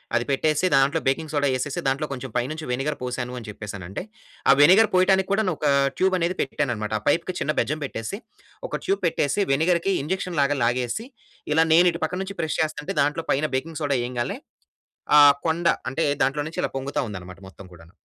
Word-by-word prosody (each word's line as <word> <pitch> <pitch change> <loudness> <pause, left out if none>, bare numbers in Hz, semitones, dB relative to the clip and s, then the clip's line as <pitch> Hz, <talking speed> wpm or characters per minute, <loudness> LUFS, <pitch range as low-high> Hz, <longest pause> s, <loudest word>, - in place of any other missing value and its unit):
అది 120 +1 +1
పెట్టేసి 155 +4 +1
దాంట్లో 140 +4 +3
బేకింగ్ 150 +3 0
సోడా 145 -1 +2
యేసేసి, 130 +2 -2
దాంట్లో 135 +3 0
కొంచెం 135 -1 -5
పైనుంచి 155 +6 -3
వెనిగర్ 135 +4 -2
పోసాను 125 0 -4
అని 120 -2 -8
చెప్పేసనంటే 100 -3 -7 0.5
ఆ - - +10
వెనిగర్ 190 +9 +7
పోయటానికి 190 +1 +3
కూడాను 200 -2 +2
ఒక 150 - -4 0.3
ట్యూబ్ 190 0 +2
అనేది 175 +1 -1
పెట్టాను 140 -1 -1
అన్నమాట. 105 -1 -4
ఆ - - -22
పైప్‌కి 165 +5 +2
ఒక - - -13
చిన్న 150 - 0
బెజ్జం 150 +2 -1
పెట్టేసి 135 - -5 0.5
ఒక - - -4
ట్యూబ్ 390 +1 0
పెట్టేసి 145 +7 0
వెనిగర్‌కి 170 +6 +2
ఇంజెక్షన్ 180 +3 -3
లాగా 140 +1 +1
లాగేసి, 120 - -1 0.5
ఇలా 160 +1 +4
నేను 175 +2 +6
ఇటు 170 +1 -7
పక్కన 180 +1 -2
నుంచి 200 +1 -8
ప్రెస్ 160 -1 -2
చేస్తుంటే, 150 -1 -3
దాంట్లో 150 +3 0
పైన 145 +3 +1
బేకింగ్ 160 +4 -3
సోడా 145 -2 +1
ఎయంగాల్నే 120 -1 -3 0.8
ఆ - - +9 0.3
కొండ 170 +1 +1 0.2
అంటే 135 +6 -1 0.2
దాంట్లో 135 +3 +1
నుంచి 155 - -6
ఇలా - - -1
పొంగుతా 135 +2 -3
ఉందన్నమాట 95 -2 -9
మొత్తం 95 +1 -13
కూడాను. 85 -1 -16
145 Hz, 190 wpm, -24 LUFS, 125-170 Hz, 0.8 s, ఆ